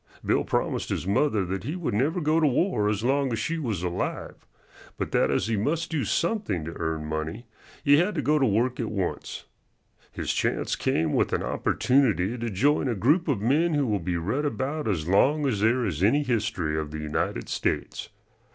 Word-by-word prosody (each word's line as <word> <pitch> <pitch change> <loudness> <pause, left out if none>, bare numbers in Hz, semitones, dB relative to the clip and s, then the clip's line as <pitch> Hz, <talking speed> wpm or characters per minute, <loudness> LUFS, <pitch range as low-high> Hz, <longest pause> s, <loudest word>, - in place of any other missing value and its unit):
Bill - - +2
promised - - -1
his - - -2
mother 100 +1 +1
that 95 +1 -4
he 145 +8 -3
would 175 - -3
never 145 - +1
go 155 +1 +2
to 155 - +4
war 125 - +1
as 105 0 -1
long 135 +1 +1
as 115 - -1
she 165 +9 -2
was 110 - -3
alive, 90 -1 -4 0.5
but - - -3
that - - +2
as - - +1
he 110 0 0
must 155 +12 -1
do 150 -5 0
something 170 - -1
to 85 - -6
earn 80 -1 -2
money, 80 +9 -4 0.4
he 145 0 +6
had 180 +5 +1
to 150 - 0
go 150 +1 +3
to 135 - +3
work 115 +4 +1
at 115 - -2
once. 95 -4 -4 0.7
His - - -2
chance - - 0
came 80 -1 0
with - - +1
an - - 0
opportunity 120 -6 +1
to 120 -1 -3
join 140 +8 +2
a 120 - 0
group 150 - +2
of 130 -9 0
men 150 +8 +2
who 145 -1 +2
will 105 -4 0
be 90 0 -2
read 105 - -1
about 145 +3 -2
as 85 -7 -1
long 145 - +3
as 120 -7 0
there 115 +4 +2
is 85 -5 -3
any 140 +10 +3
history 105 - -1
of 80 -1 -2
the 75 - -6
United 75 -5 -2
States. - - -2
115 Hz, 205 wpm, -26 LUFS, 95-145 Hz, 0.7 s, he